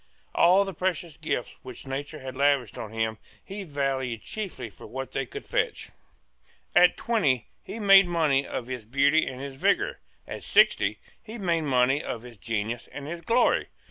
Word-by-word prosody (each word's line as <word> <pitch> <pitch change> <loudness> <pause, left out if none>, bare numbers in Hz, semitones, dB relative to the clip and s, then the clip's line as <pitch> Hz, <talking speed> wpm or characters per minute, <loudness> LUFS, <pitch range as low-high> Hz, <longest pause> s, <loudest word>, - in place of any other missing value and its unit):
All 185 +3 +5
the 195 - -5
precious 175 -4 -2
gifts 120 - -3
which 130 0 -10
nature 140 +3 -5
had 130 0 -7
lavished 140 -4 +2
on 110 - -6
him 110 -1 -2 0.3
he 200 +1 -6
valued 135 - -2
chiefly 190 - -5
for 105 - -13
what 135 +1 -6
they 135 -1 -2
would - - -7
fetch. - - -2 0.8
At 180 0 +6
twenty 145 - +1
he - - -8
made 195 -3 +7
money 155 -6 +2
of 120 - -4
his 125 -2 -5
beauty 140 +7 +3
and 130 - -6
his 135 -1 -7
vigour. 200 +7 +1 0.3
At - - -6
sixty - - +3 0.2
he 230 +1 -9
made 170 -6 0
money 130 +1 +3
of 115 - -5
his 120 -3 -12
genius 115 +2 -3
and 145 - -7
his 170 +2 -5
glory. 235 +7 +2
140 Hz, 175 wpm, -27 LUFS, 125-175 Hz, 0.8 s, made